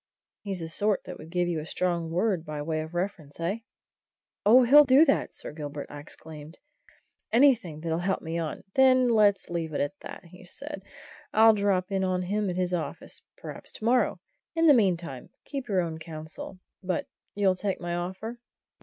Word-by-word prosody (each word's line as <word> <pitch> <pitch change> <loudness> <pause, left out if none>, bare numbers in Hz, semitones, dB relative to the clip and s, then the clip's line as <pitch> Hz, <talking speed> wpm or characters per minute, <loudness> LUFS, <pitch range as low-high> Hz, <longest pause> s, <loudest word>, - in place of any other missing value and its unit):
He's 195 -4 -5
the 165 - -4
sort 205 +4 +1
that 180 - -9
would 155 - -11
give 175 0 0
you 170 -2 -1
a 155 - -6
strong 175 -3 -1
word 180 0 0
by 155 -2 -6
way 155 0 -1
of 160 +2 -8
reference, 175 -6 -4
eh?" 180 +7 -1 0.8
"Oh, 235 +5 +7
he'll 290 +5 +8
do 275 +3 +6
that, 275 - +1
Sir - - -6
Gilbert!" 145 -1 -7
I 145 - -7
exclaimed. 155 +1 -11 0.7
"Anything 230 - +3
that'll 165 0 -1
help 190 +2 -1
me 165 +1 -3
on 160 -2 -4
" 195 - -41
"Then 255 -1 +5
let's 210 -5 +3
leave 165 -2 -3
it - - 0
at 145 +7 -2
that," - - -9 0.2
said 285 +4 -8
he. 200 - -26 0.5
"I'll 220 +1 +7
drop 200 -3 0
in 195 -1 0
on 185 -1 0
him 205 +2 -1
at 180 - -3
his 180 -1 0
office 170 -3 -4 0.2
perhaps - - -8
to 215 - -7
morrow. 235 -6 +2 0.4
In 330 0 +3
the 300 - +8
meantime, 175 - 0 0.2
keep 275 -4 -5
your 195 -4 +2
own 160 -2 -4
counsel. 160 +3 -8 0.2
But 185 -3 -2 0.3
you'll 200 -2 +3
take 195 +1 -3
my 175 0 -4
offer?" 190 +7 -4
185 Hz, 190 wpm, -27 LUFS, 165-215 Hz, 0.8 s, he'll